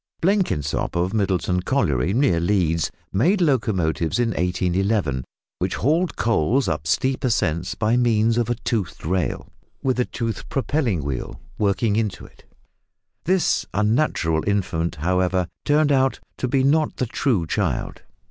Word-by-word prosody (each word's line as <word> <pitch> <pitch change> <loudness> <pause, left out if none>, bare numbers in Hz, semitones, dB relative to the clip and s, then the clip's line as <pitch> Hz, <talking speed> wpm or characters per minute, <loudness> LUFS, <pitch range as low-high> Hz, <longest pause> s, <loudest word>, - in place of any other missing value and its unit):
Blenkinsop, 175 - 0
of 90 +3 0
Middleton 95 -3 0
Colliery, 85 - +1
near 120 -6 +2
Leeds, 85 -3 +1 0.2
made 175 - +3
locomotives 105 - +1
in 120 -1 +1
1811 90 - 0 0.4
which - - -1
hauled 160 - +1
coals 115 - +1
up 75 -2 -2
steep 130 - 0
ascents 85 - 0
by 110 +2 +1
means 115 -1 +2
of 120 - -1
a 120 - +1
toothed 110 -8 -3
rail, 90 +2 -1 0.4
with 130 -1 +1
a 125 - +2
toothed 115 -4 -4
propelling 130 - 0
wheel 70 -3 -4 0.2
working 105 +1 +1
into 110 -3 -2
it. - - -19 0.8
This 185 +1 +1
unnatural 105 - +1
infant, 90 -4 -1
however, 90 +3 0 0.2
turned 150 0 +3
out 135 -2 +2 0.2
to 130 - -1
be 130 +1 +1
not 150 +3 +2
the 125 - 0
true 115 - 0
child. - - -2
105 Hz, 140 wpm, -22 LUFS, 90-130 Hz, 0.8 s, made